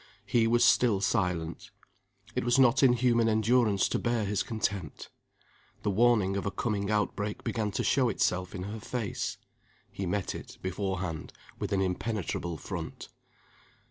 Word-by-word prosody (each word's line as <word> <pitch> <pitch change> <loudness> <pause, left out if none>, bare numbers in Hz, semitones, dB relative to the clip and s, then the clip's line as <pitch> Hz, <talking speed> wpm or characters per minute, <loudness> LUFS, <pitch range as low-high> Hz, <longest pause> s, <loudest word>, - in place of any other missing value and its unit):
He 115 -2 +2
was 120 +1 +4
still 115 -4 +4
silent. 90 -6 -1 0.6
It - - -1
was 120 +2 +3
not 130 0 +5
in 130 -3 +6
human 120 -2 +3
endurance 110 -2 +3
to - - 0
bear 120 -3 0
his 100 0 0
contempt. 100 - -3 0.7
The 105 - +1
warning 105 -2 +3
of 100 - -2
a - - +2
coming 100 0 -2
outbreak 105 -1 -1
began 110 -3 -1
to - - -1
show 130 -3 +3
itself 90 -3 0
in 90 - -4
her 105 +3 -5
face. 115 -1 -3 0.5
He 95 - -4
met 100 +1 -1
it, - - -9
beforehand, 95 -3 -3 0.3
with 105 -1 -3
an 95 -1 +2
impenetrable 90 -3 -2
front. - - -6
105 Hz, 150 wpm, -29 LUFS, 95-120 Hz, 0.7 s, in